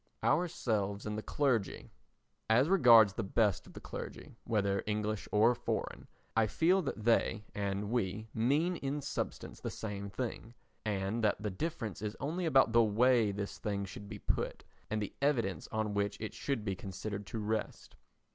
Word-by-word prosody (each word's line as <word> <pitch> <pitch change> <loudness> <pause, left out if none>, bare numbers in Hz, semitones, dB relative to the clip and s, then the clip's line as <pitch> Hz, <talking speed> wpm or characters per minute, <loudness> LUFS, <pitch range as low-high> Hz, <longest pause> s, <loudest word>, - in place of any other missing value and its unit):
Ourselves 110 - 0
and 105 0 -2
the 110 - -3
Clergy 120 -6 0 0.6
As 125 +7 +4
regards 115 - +7
the 110 - -2
best 105 0 +1
of - - -14
the - - -8
clergy, - - -7
whether 100 -3 +1
English 105 0 -1
or 110 +3 +5
foreign, - - -3 0.3
I 115 -1 +4
feel 180 - +3
that 135 -9 -4
they 115 -1 +2
and 100 +1 -2
we 110 -2 -1
mean 145 +10 +2
in 140 +1 -2
substance - - -4
the - - -4
same 100 -2 -5
thing, 115 +1 -5 0.3
and 105 +2 -1
that 105 - +2
the 105 -1 -3
difference 115 - -4
is 105 0 -4
only 165 +6 -2
about 135 -6 +5
the 115 0 +7
way 115 0 +4
this 100 0 -5
thing 100 -1 -2
should 100 +1 -9
be - - -6
put - - -2 0.3
and 110 0 0
the - - -6
evidence 115 - +1
on 110 -1 -1
which 100 0 0
it 110 -1 -5
should 135 -7 -2
be 100 -2 -1
considered 100 +2 -6
to 115 - -5
rest. 110 0 -3
110 Hz, 170 wpm, -33 LUFS, 100-125 Hz, 0.6 s, regards